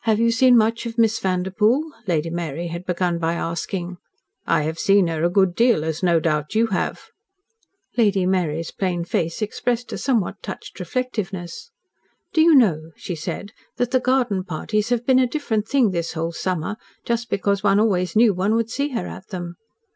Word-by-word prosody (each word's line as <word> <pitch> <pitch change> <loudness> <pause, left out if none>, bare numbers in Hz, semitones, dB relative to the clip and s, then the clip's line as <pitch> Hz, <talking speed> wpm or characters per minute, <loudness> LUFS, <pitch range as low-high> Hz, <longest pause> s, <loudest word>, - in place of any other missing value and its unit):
"Have 220 -1 +2
you 230 0 +3
seen 245 +1 +5
much 230 +1 +1
of 230 0 -7
Miss 225 -1 +3
Vanderpoel?" 210 - +1 0.2
Lady 165 -2 0
Mary 170 0 -4
had 170 +3 -7
begun 175 -1 0
by 165 0 0
asking. 175 +2 -4 0.5
"I 155 - +2
have 160 +2 -3
SEEN 200 -1 +4
her 165 -1 -2
a 170 - +3
good 190 0 +3
deal, 230 -6 +3
as 160 0 -3
no 170 -3 +3
doubt 150 +2 -1
you 225 +1 +4
have." - - -2 0.9
Lady 205 -5 +3
Mary's 165 -4 0
plain 175 -3 -2
face 165 +4 -1
expressed 240 +3 -2
a - - -4
somewhat 235 -8 0
touched - - -8
reflectiveness. 205 - -4 0.6
"Do 320 - +4
you 325 -1 +6
know," 165 - +3
she 180 - -6
said, 175 +5 -5 0.3
"that 245 0 0
the 255 - +3
garden 250 -7 +1
parties 210 +5 -2
have 240 -1 0
been 260 0 +4
a 255 - +3
different 230 -6 -2
thing 250 -6 +3
this 170 -2 -2
whole 165 +1 -2
summer, 180 +3 -3 0.3
just 235 0 -1
because 200 0 0
one 200 -1 +3
always 190 -4 +1
knew 220 -1 +5
one 195 +4 +1
would 230 0 0
see 280 +3 -1
her 230 - -2
at 190 - -9
them?" 175 -3 -6
195 Hz, 185 wpm, -22 LUFS, 170-230 Hz, 0.9 s, you